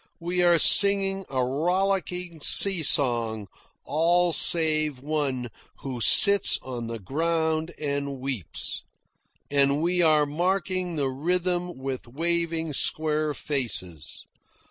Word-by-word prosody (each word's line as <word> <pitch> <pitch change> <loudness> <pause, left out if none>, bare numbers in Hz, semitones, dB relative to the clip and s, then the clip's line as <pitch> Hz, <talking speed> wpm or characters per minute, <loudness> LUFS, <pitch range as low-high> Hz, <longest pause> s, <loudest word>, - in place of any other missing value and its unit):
We 175 +1 -2
are 175 -1 +4
singing 195 +2 +5
a 130 -2 -2
rollicking 180 +3 -3
sea 195 +3 +6
song, 120 -8 +1 0.4
all 170 +3 +1
save 155 -6 +1
one 140 -5 -3 0.3
who 130 -3 -7
sits 200 - +5
on 120 -3 -7
the 115 0 -6
ground 160 - -3
and 140 -2 -4
weeps; 130 - -5 0.7
and 140 0 +1
we 175 +1 0
are 155 -3 +3
marking 180 +3 -3
the 140 -3 -2
rhythm 175 +4 -3
with 130 -1 -7
waving 165 +3 -3
square 155 +1 -1
faces. 100 - -4
155 Hz, 110 wpm, -24 LUFS, 135-175 Hz, 0.7 s, sea